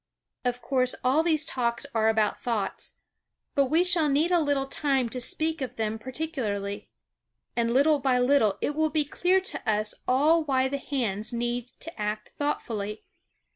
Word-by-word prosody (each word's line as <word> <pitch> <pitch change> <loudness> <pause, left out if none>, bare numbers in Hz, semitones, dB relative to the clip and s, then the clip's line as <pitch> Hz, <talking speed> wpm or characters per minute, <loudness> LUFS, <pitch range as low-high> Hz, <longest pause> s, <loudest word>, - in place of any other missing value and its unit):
Of 245 -1 -2
course, 255 0 +1
all 260 +5 +3
these 315 -3 +2
Talks 235 0 -1
are 220 -1 +2
about 220 -1 +1
thoughts. 230 -5 -3 0.6
But 280 - +3
we 320 +6 +3
shall 345 -4 +5
need 300 +5 +2
a 350 - +4
little 285 -3 +1
time 270 -2 0
to 250 +2 -2
speak 315 +5 +1
of 260 - -4
them 220 0 -2
particularly. 225 - -4 0.7
And 235 -1 +1
little 285 +4 +4
by 260 -2 +2
little 250 -5 +3
it 290 - 0
will 315 +1 +1
be 305 -1 +1
clear 360 +6 +2
to 380 - -3
us 215 0 +1
all 305 +6 +3
why 265 -3 +1
the 280 +1 -3
hands 225 -6 -2
need 240 0 -2
to 325 -9 -8
act 210 0 -3
thoughtfully. 215 -7 -3
260 Hz, 170 wpm, -27 LUFS, 225-300 Hz, 0.7 s, shall